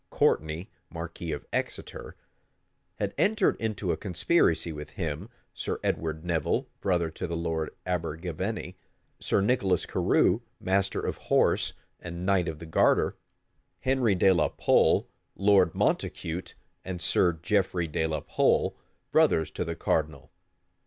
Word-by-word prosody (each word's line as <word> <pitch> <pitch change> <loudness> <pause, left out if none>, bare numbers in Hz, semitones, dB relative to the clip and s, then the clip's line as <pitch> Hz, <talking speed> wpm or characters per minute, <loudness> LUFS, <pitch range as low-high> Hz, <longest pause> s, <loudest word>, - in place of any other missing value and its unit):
Courtney, 80 +4 0 0.2
marquis 85 0 -6
of 75 - -5
Exeter, - - -4 0.8
had 100 -1 -2
entered 210 -1 +3
into 110 -5 -1
a 80 - -1
conspiracy 90 - +1
with 75 0 -8
him; 85 +3 -4 0.2
Sir - - -3
Edward 80 0 -2
Nevil, 85 -2 0
brother 85 -4 0
to - - -5
the 85 0 -3
lord 80 -2 -2 0.2
Abergavenny; 90 +2 -3 0.4
Sir - - +1
Nicholas 100 -5 +2
Carew, - - +2 0.2
master 95 +1 0
of - - -3
horse, - - +2 0.3
and 85 +1 -6
knight 95 -2 +2
of 80 - -3
the 80 - -9
garter; 80 - +3 0.7
Henry 130 -6 +2
de 95 +1 +5
la 80 -4 +2
Pole, - - +3 0.3
Lord 100 -4 +4
Montacute, 85 +2 -1 0.3
and 95 -2 -5
Sir 85 +1 +3
Geoffrey 90 +1 0
de 80 +1 -1
la 75 -2 -2
Pole, - - +2 0.4
brothers 80 - +3
to - - -3
the - - -4
cardinal. 75 -3 -1
85 Hz, 130 wpm, -28 LUFS, 80-95 Hz, 0.8 s, de